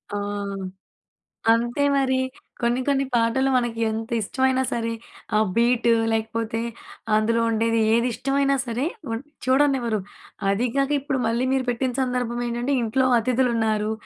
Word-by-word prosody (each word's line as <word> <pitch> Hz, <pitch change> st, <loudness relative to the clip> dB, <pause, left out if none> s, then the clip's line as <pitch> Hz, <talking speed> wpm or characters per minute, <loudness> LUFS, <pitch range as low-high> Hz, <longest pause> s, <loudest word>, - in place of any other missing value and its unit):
ఆ! -, -, -1 dB, 1.3 s
అంతే 240 Hz, +5 st, 0 dB
మరి. 260 Hz, -1 st, +2 dB, 0.4 s
కొన్ని, 240 Hz, +2 st, +1 dB
కొన్ని 275 Hz, -1 st, +2 dB
పాటలు 235 Hz, +4 st, +2 dB
మనకు 240 Hz, -2 st, 0 dB
ఎంత 225 Hz, +1 st, -4 dB
ఇష్టమైనా 260 Hz, +4 st, +1 dB
సరే, 230 Hz, -1 st, -1 dB, 0.4 s
ఆ -, -, +5 dB, 0.2 s
బీటు 235 Hz, 0 st, +3 dB, 0.2 s
లేకపోతే, 225 Hz, 0 st, -2 dB, 0.6 s
అందులో 230 Hz, +2 st, +2 dB
ఉండేది 225 Hz, +1 st, +1 dB
ఏది 235 Hz, +2 st, +3 dB
ఇష్టమైనా 275 Hz, +2 st, +1 dB
సరే 240 Hz, +4 st, -2 dB, 0.3 s
వన్ 225 Hz, +2 st, -2 dB, 0.2 s
చూడనివ్వరు. 260 Hz, -5 st, +2 dB, 0.5 s
అది 210 Hz, +5 st, +1 dB
కాక 275 Hz, +1 st, +1 dB
ఇప్పుడు 270 Hz, -1 st, -2 dB
మళ్ళీ 235 Hz, +3 st, 0 dB
మీరు 260 Hz, -1 st, 0 dB
పెట్టిన 250 Hz, +1 st, 0 dB
సందర్భం 245 Hz, -2 st, -1 dB
ఏంటంటే, 240 Hz, +4 st, -1 dB
ఇంట్లో 260 Hz, +4 st, +1 dB
అతిథులు 250 Hz, +1 st, +1 dB
ఉన్నారు. 215 Hz, -1 st, 0 dB
240 Hz, 130 wpm, -24 LUFS, 230-260 Hz, 1.3 s, ఆ